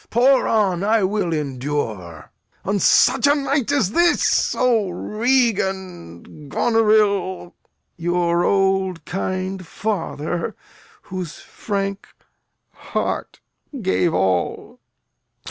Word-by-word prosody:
Pour 255 +3 +3
on; 195 -5 +1
I 215 0 +2
will 190 -2 0
endure. 130 - -4 0.3
In 200 +1 0
such 260 +8 +4
a 285 - +4
night 275 -2 0
as 265 -10 +1
this! 345 +6 +2
O 230 -6 +2
Regan, 190 - -2
Goneril! 210 - +1 0.4
Your 175 0 +1
old 190 -4 +1
kind 185 0 -4
father, 175 -6 -3 0.5
whose 185 -4 -6
frank 200 -1 -4 0.7
heart - - -4 0.4
gave 185 -4 +1
all! 95 - -1
190 Hz, 90 wpm, -21 LUFS, 170-220 Hz, 0.7 s, such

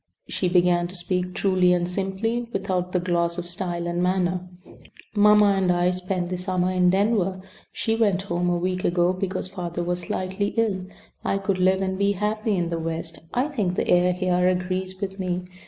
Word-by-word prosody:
She 180 - -1
began 175 -1 +3
to 185 - -8
speak 180 0 -1
truly 185 -2 +3
and 175 -1 +1
simply 195 +6 -2
without 185 -3 -2
the 180 - +1
gloss 170 -1 0
of 175 -1 -4
style 175 -1 -3
and 175 0 -1
manner: 180 0 0 0.6
"Mamma 210 -1 +6
and 190 -2 +2
I 175 0 +2
spent 180 -1 -2
the 180 - -1
summer 180 0 0
in 180 -1 +3
Denver. 195 -1 +1 0.3
She 225 - -1
went 200 -5 +2
home 175 -2 -1
a 175 - +1
week 185 +1 -2
ago 175 +1 +2
because 185 0 -3
father 175 -2 -4
was 175 +1 -1
slightly 190 +3 -3
ill. 195 -5 0 0.4
I 195 - 0
could 195 -1 -1
live 190 +1 +3
and 190 0 -2
be 200 0 +3
happy 210 +2 -1
in 170 -1 -1
the 165 - -1
West. 165 +1 -4
I 250 +4 +1
think 205 -11 -1
the - - -1
air 180 0 +4
here 180 0 +1
agrees 185 +1 -1
with 195 -1 -4
me. 180 -1 -2
185 Hz, 190 wpm, -24 LUFS, 180-195 Hz, 0.6 s, Mamma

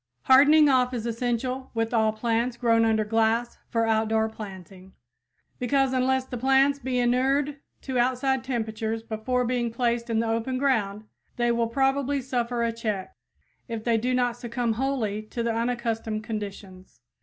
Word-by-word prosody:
Hardening 295 +3 +6
off 255 -2 +2
is 230 -2 -4
essential 245 +2 -2
with 225 +1 -1
all 220 -1 +3
plants 235 +2 -1
grown 230 -2 +3
under 220 -1 +2
glass 225 +2 0
for 230 -1 +1
outdoor 220 0 +1
planting, 190 -3 -10 0.7
because 270 +1 +1
unless 260 0 +1
the 250 -2 -6
plants 270 +2 +3
be 260 -2 -2
inured 265 +4 +1 0.2
to 260 -2 -2
outside 255 +1 +1
temperatures 225 -3 -3
before 230 +3 -1
being 240 -1 -1
placed 235 0 -1
in 225 - 0
the 225 0 +1
open 230 +3 -1
ground, 220 -7 0 0.3
they 240 0 +1
will 235 0 +1
probably 270 +3 +1
suffer 245 -2 -2
a 230 - +1
check, 215 -5 -4 0.5
if 230 -3 -5
they 230 -1 +2
do 250 +3 0
not 245 -1 +1
succumb 240 -1 -2
wholly 230 -4 -1
to 225 +2 -5
the 230 -1 0
unaccustomed 230 -2 -2
conditions. 200 - -7
235 Hz, 155 wpm, -26 LUFS, 225-255 Hz, 0.7 s, Hardening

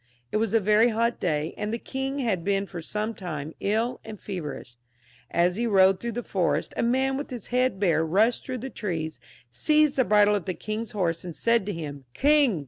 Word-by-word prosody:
It - - +1
was 225 0 0
a - - +6
very 215 +3 +4
hot 235 +1 0
day, 155 -2 -1
and 210 0 -2
the 230 - -1
king 265 +3 -4
had 220 -10 0
been 195 +1 +1
for 175 -3 -7
some 215 +6 -3
time 160 -6 -6
ill 225 +5 0
and 215 -2 -9
feverish. 150 -10 -6 0.5
As 175 +2 +2
he 235 +1 0
rode 190 -3 +5
through 235 +1 -4
the 240 +2 -3
forest 185 -5 0
a - - 0
man 265 +3 +1
with 285 - -5
his 245 -6 -7
head 250 -5 +2
bare 165 -5 +3
rushed 210 +9 +2
through 255 - -4
the 265 - -6
trees, 160 - -4 0.3
seized 300 - +2
the 260 - +5
bridle 210 -2 +4
of 200 -4 -1
the 185 - -2
king's 215 +2 -4
horse, 170 -5 -1
and 175 -3 -7
said 230 -1 +2
to - - 0
him, 145 -5 -6
"King! 285 - +4
210 Hz, 215 wpm, -26 LUFS, 175-235 Hz, 0.5 s, a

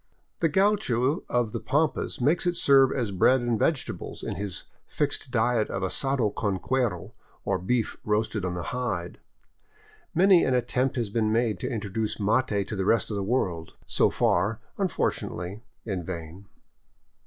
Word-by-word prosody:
The 165 - +2
gaucho 160 - +2
of 120 -3 +1
the - - -3
pampas 150 +1 0
makes 150 +8 +2
it 175 -1 0
serve 135 -1 +5
as 120 -6 -1
bread 125 +8 +4
and 120 -2 0
vegetables 145 +1 -2
in - - -3
his 100 -4 -3 0.2
fixed 145 -2 -2
diet 120 -2 +1
of 95 - -3
asado 125 +2 +1
con 100 -3 -1
cuero, 120 -6 -1 0.3
or - - 0
beef 115 +5 -1
roasted 105 -1 0
in 90 -1 -2
the 85 - -4
hide. 100 -9 -3 1.0
Many 185 0 +6
an 130 - +2
attempt 125 +2 0
has 115 -5 -2
been 110 -1 +1
made 115 -1 +1
to - - -3
introduce 110 -1 -3
mate 105 -1 +1
to - - -3
the 95 - -1
rest 115 +3 +2
of - - -2
the 100 - -1
world, 95 -7 -1
so - - +2
far, 100 +5 +1 0.2
unfortunately, 105 - -2 0.2
in 95 -5 -3
vain. 85 +2 -7
115 Hz, 160 wpm, -27 LUFS, 100-130 Hz, 1.0 s, Many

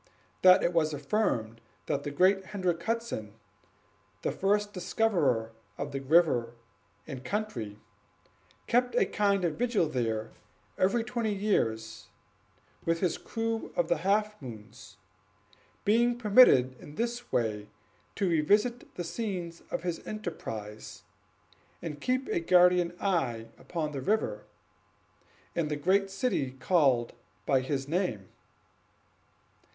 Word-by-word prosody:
That 185 0 +7
it 175 - +1
was 155 -2 +2
affirmed 130 - -1 0.2
that 140 - -1
the 145 - -4
great 190 +6 +3
Hendrick 180 -4 -1
Hudson, 225 - -3 0.9
the - - 0
first 205 +1 0
discoverer 170 - +1 0.3
of 140 0 -4
the 135 - -3
river 135 -5 +3 0.5
and 130 -1 -7
country, 125 - -3 0.9
kept 245 0 +1
a - - +4
kind 200 -3 +1
of 160 -3 -1
vigil 235 -8 +2
there 115 -6 -2 0.4
every 225 +5 +2
twenty 230 -3 -2
years, 110 - -1 0.8
with 165 0 0
his 180 -2 0
crew 225 0 -3
of 170 -1 0
the 170 - +3
Half 210 +4 0
moon; 110 -6 -9 1.1
being 235 +3 +3
permitted 200 - +5
in 145 - -11
this 240 +3 -3
way 105 -3 -1 0.5
to 195 - 0
revisit 205 +9 +1
the 175 - -3
scenes 175 -3 -4
of - - -3
his 175 -2 -2
enterprise, 110 - -6 0.8
and 150 -4 -6
keep 255 +1 0
a - - +1
guardian 180 0 +4
eye 125 - -1
upon 160 -4 -3
the 140 -2 -4
river 180 - -1 1.1
and 165 -3 0
the 150 - -1
great 190 +6 +2
city 190 - -1
called 130 -6 +2 0.3
by 135 -2 +3
his 135 0 -3
name. 145 - -2
170 Hz, 125 wpm, -29 LUFS, 130-210 Hz, 1.1 s, That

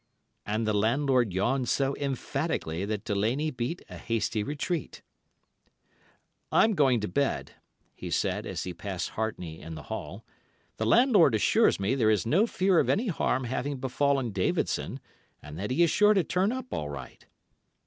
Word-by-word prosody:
And 110 +2 -1
the 110 - +1
landlord 120 +2 +2
yawned 120 +7 0
so 135 0 +1
emphatically 135 - -2
that 105 -1 -3
Delaney 115 +10 0
beat 125 +7 -4
a - - -10
hasty 115 -1 -1
retreat. 150 - -4 1.5
"'I'm 220 - +4
going 135 - +3
to 105 - -2
bed,' 135 +10 -1 0.4
he - - -7
said, - - -1
as - - -4
he 90 - -5
passed 95 0 -4
Hartney 90 -7 -4
in 80 0 -8
the - - -8
hall. - - -7 0.5
'The - - -1
landlord 215 - +5
assures 105 - +3
me 100 +6 0
there 120 -5 +2
is 110 +1 +2
no 185 - +3
fear 185 -5 +2
of - - +1
any 220 +3 +1
harm 130 -5 0
having 130 +3 -3
befallen 135 -1 0
Davidson, 95 -2 -1 0.4
and 75 +2 -10
that 100 - -3
he 150 +7 +3
is 170 - +3
sure 210 0 +5
to 190 - +3
turn 185 +5 +1
up 255 0 -5
all 75 - -3
right. 70 -1 -9
130 Hz, 165 wpm, -28 LUFS, 105-155 Hz, 1.5 s, landlord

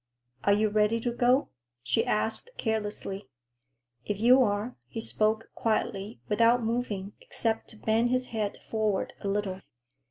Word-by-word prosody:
"Are 200 - +5
you 215 +1 +3
ready 210 +2 +2
to 240 - 0
go?" 245 +3 +3 0.3
she 125 - +2
asked 225 - 0
carelessly. 210 - -2 0.8
"If 205 -1 -3
you 250 +4 +6
are," 210 0 0
he 140 - -6
spoke 220 0 0
quietly, 215 -1 -1
without 230 +3 +4
moving, 220 -4 -2
except 225 -1 -1
to 220 - -9
bend 225 +3 +2
his 255 0 +1
head 210 -2 -1
forward 215 -3 0
a - - -3
little. 195 -2 -1
220 Hz, 140 wpm, -29 LUFS, 205-230 Hz, 0.8 s, you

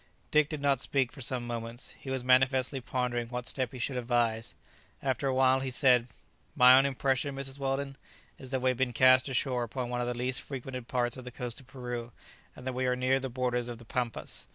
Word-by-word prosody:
Dick 150 -1 +4
did 155 -3 -4
not 140 -2 +3
speak 135 -2 0
for 135 - -11
some 125 -1 -2
moments. 115 0 -5
He 135 - -8
was 130 -1 -2
manifestly 130 +1 +3
pondering 120 -1 -2
what 125 +1 -5
step 130 -2 -1
he 130 - -8
should 125 +2 -2
advise. 115 -2 0 0.5
After 135 0 0
a 135 - +1
while 130 0 +4
he 135 0 -3
said, 125 -2 +4 0.5
"My 125 -2 +8
own 135 +1 +5
impression, 135 0 0
Mrs. 135 0 -6
Weldon, 135 0 -2 0.4
is 130 - -9
that 130 -1 -2
we 130 - +4
have 125 - -5
been 130 -1 0
cast 130 +2 +5
ashore 130 -1 0
upon 120 +1 -3
one 125 0 -1
of 120 - -1
the 120 -1 -2
least 125 +1 0
frequented 130 -2 -6
parts 120 -1 0
of 130 - -8
the 125 - -7
coast 125 -1 -5
of 130 - -17
Peru, 125 -3 -6 0.4
and 125 - -12
that 130 - -2
we 130 +1 -1
are 125 - +2
near 130 +1 +2
the 135 0 -4
borders 125 -1 -1
of 120 - -6
the 120 - -14
Pampas. 120 0 -3
130 Hz, 225 wpm, -30 LUFS, 120-135 Hz, 0.5 s, My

